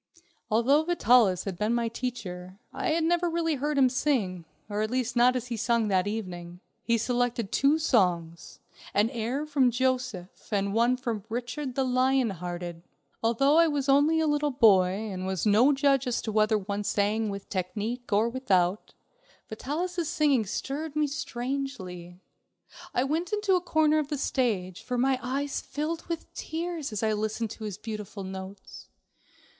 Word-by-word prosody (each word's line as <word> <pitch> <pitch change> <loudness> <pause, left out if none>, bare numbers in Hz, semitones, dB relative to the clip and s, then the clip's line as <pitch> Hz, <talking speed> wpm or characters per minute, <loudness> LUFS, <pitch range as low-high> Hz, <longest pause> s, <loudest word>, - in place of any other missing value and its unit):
Although 255 +8 +3
Vitalis 240 - +4
had 190 -3 -5
been 215 +3 +1
my 235 -1 0
teacher, 200 -7 -5 0.2
I - - -2
had 320 +1 +1
never 345 +1 +2
really 330 -1 0
heard 295 +1 -1
him 265 -2 +6
sing, 235 - 0 0.2
or 205 0 -2
at 215 - 0
least 250 0 -1
not 245 +1 +5
as 250 -1 -3
he 235 - -3
sung 230 0 +1
that 190 0 +2
evening. 180 -5 -5 0.2
He 230 0 +1
selected 240 -2 -1
two 280 +3 +3
songs, 175 - 0 0.4
an 210 +4 +3
air 250 +4 -2
from 280 -4 +3
"Joseph" 250 -7 -2
and 200 -1 0
one 240 +3 +3
from 235 -5 -3
"Richard 250 +3 -4
the 270 - +1
Lion 255 -1 +2
Hearted." 175 -1 -6 0.4
Although 275 +7 +3
I 335 - +6
was 290 -3 -1
only 290 +4 +4
a 320 - +2
little 295 -1 +1
boy 215 -9 +5 0.2
and 185 0 -4
was 190 0 -2
no 220 +7 +5
judge 275 -1 +2
as 245 - 0
to 220 - -3
whether 215 0 +3
one 205 +1 -3
sang 210 +2 0
with 200 -1 -6
technique 215 +6 -4
or 210 +3 +3
without, 200 -7 0 0.5
Vitalis' 330 +9 -3
singing 275 -8 +2
stirred 290 +8 -4
me 305 0 +2
strangely. 240 -11 -5 0.7
I 250 - +1
went 320 +6 -1
into 415 -2 +1
a 365 - +3
corner 310 -3 +2
of 300 - -2
the 295 0 -3
stage, 210 -10 -1
for 250 -1 -3
my 260 +1 +2
eyes 275 +2 -2
filled 315 +3 -4
with 335 -1 -5
tears 330 -4 -4
as 215 0 -3
I 220 -1 +2
listened 215 +1 -2
to 220 - -7
his 205 -3 -5
beautiful 210 -2 -6
notes. 190 +1 -9
240 Hz, 170 wpm, -28 LUFS, 205-280 Hz, 0.7 s, him